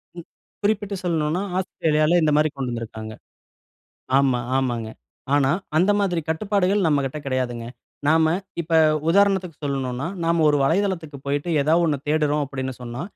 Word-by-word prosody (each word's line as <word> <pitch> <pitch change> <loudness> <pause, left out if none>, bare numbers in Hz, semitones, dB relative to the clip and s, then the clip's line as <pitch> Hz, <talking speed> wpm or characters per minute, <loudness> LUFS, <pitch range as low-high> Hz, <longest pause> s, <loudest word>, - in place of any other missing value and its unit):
ம். 170 -2 -9 0.4
குறிப்பிட்டு 205 -1 0
சொல்னுனா 165 0 0 0.2
ஆஸ்திரேலியால 160 -2 +1
இந்த 155 - +3
மாரி 155 +1 +3
கொண்டுந்திருக்காங்க. 115 -4 -5 1.1
ஆமா, 130 -3 +2 0.2
ஆமாங்க. 120 -4 -1 0.5
ஆனா, 140 -2 +3 0.3
அந்த 180 +5 +4
மாதிரி 180 -4 0
கட்டுப்பாடுகள் 195 +2 +1
நம்மகிட்ட 145 -2 0
கிடையாதுங்க. 125 -3 -2 0.4
நாம 160 0 +4 0.3
இப்ப 165 0 +2 0.3
உதாரணத்துக்கு 190 -2 +2
சொல்ணுனா, 135 -1 -2 0.2
நாம 165 0 +2
ஒரு 145 - +3
வலைதளத்திற்கு 165 -2 0
போய்ட்டு 145 +4 -1
ஏதா 155 +3 +3
ஒண்ணு 150 -4 +1
தேடுறோம் 150 -1 +1
அப்டின்னு 130 -1 -5
சொன்னா, 120 +3 -6
155 Hz, 130 wpm, -23 LUFS, 135-175 Hz, 1.1 s, அந்த